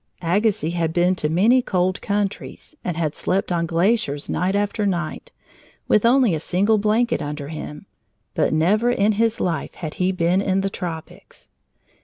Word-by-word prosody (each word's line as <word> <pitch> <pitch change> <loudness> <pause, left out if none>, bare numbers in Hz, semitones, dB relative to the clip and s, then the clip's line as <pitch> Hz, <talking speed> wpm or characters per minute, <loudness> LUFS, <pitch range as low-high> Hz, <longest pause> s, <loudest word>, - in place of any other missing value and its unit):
Agassiz 180 -2 +1
had 165 -2 -1
been 180 +1 +3
to 155 -5 -1
many 215 +10 +4
cold 185 -4 -1
countries 205 +8 -3
and 175 -3 -3
had 155 -3 -1
slept 190 0 -1
on 170 -1 0
glaciers 170 -4 0
night 185 +3 0
after 205 +1 0
night, 175 - -3 0.6
with 215 +2 +4
only 250 -5 +4
a 160 - -1
single 200 +7 +1
blanket 220 +4 +1
under 145 -1 -5
him, 150 -1 -7 0.5
but - - +1
never 200 +10 +2
in 215 -3 +2
his 225 +2 +1
life 175 -3 -2
had 155 -4 -6
he 185 +1 +2
been 180 +1 +1
in 195 -1 +1
the 195 0 -2
tropics. 165 -5 -8
185 Hz, 165 wpm, -22 LUFS, 165-210 Hz, 0.6 s, many